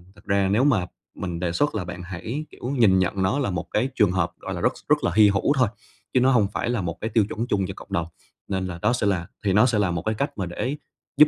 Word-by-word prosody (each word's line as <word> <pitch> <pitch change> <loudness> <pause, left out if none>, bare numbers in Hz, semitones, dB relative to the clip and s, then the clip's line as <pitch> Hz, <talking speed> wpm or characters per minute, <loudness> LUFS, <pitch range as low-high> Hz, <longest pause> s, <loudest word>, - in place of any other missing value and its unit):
thực - - -20
ra 100 -1 +2
nếu 110 +6 +3
mà 115 -11 +3 0.3
mình 85 -2 -4
đề 90 -1 -1
xuất 145 +11 0
là 105 - -1
bạn 90 0 -7
hãy, 110 - -5
kiểu, - - -16
nhìn 95 -6 +5
nhận 95 +1 0
nó 115 +10 +1
là 130 - 0
một 85 -2 -3
cái 125 +5 +1
trường 100 -4 +4
hợp, 90 -2 0
gọi - - -5
là, - - -4
rất - - +2 0.2
rất - - +3
là - - +1
hy 105 -1 +7
hữu 100 +8 +2
thôi, 130 -5 +3 0.5
chứ 130 - +4
nó 130 +2 +4
hông 110 -6 +4
phải - - -1
là 120 -5 0
một 85 -2 -4
cái 110 - -2
tiêu 110 -3 +3
chuẩn 115 +3 -3
chung 95 -4 +1
cho 95 - -5
cộng - - -11
đồng. 85 -1 0 0.4
Nên 95 -1 -2
là, 85 -2 -6
đó 125 - +3
sẽ 115 -4 0
là 90 -4 0 0.2
thì 95 - +3
nó 110 +4 +6
sẽ 115 -4 +2
là 95 -4 +2
một 85 - -2
cái 110 - 0
cách 140 +2 -2
mà 95 - -1
để 125 +11 -3 0.4
giúp 150 - +8
100 Hz, 295 wpm, -24 LUFS, 90-120 Hz, 0.5 s, giúp